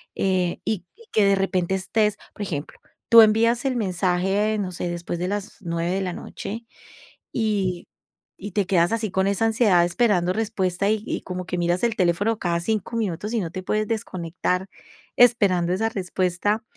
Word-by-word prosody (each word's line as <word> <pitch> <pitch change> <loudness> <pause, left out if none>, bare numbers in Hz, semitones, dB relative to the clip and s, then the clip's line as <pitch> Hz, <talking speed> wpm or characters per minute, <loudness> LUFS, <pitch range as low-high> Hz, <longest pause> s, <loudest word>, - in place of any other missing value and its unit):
eh, 185 -2 0
y 200 -5 -2 0.3
que 215 - +3
de 200 0 +4
repente 190 -1 0
estés, 210 +2 0 0.2
por - - -10
ejemplo, 155 -6 -5 0.3
tú 230 -1 +10
envías 230 +3 +4
el 265 - +1
mensaje, 190 +2 +1
no 185 -2 -2
sé, 175 0 -3
después 170 0 -4
de 180 - -1
las 205 +1 -4
9 170 0 -2
de 195 +1 0
la 185 - -2
noche, 225 +6 -7 0.7
y, 200 -6 -1 0.5
y 205 +1 -7
te 205 -3 +1
quedas 175 -1 +3
así 220 -3 -1
con 190 +1 +1
esa 200 +3 +1
ansiedad 215 -6 +4
esperando 180 -3 +2
respuesta 200 -3 -1
y 215 0 0
y - - -2
como 180 -1 -5
que 180 +1 -3
miras 175 +4 0
el 230 -2 +1
teléfono 200 +5 +1
cada 170 -1 0
5 220 +4 -2
minutos 210 0 -2
y 230 - +1
no 165 -2 -4
te 185 0 -6
puedes 215 +2 0
desconectar, 185 -3 -2 0.5
esperando 195 -8 +4
esa 220 +4 0
respuesta, 190 +2 -1
195 Hz, 175 wpm, -23 LUFS, 180-215 Hz, 0.7 s, tú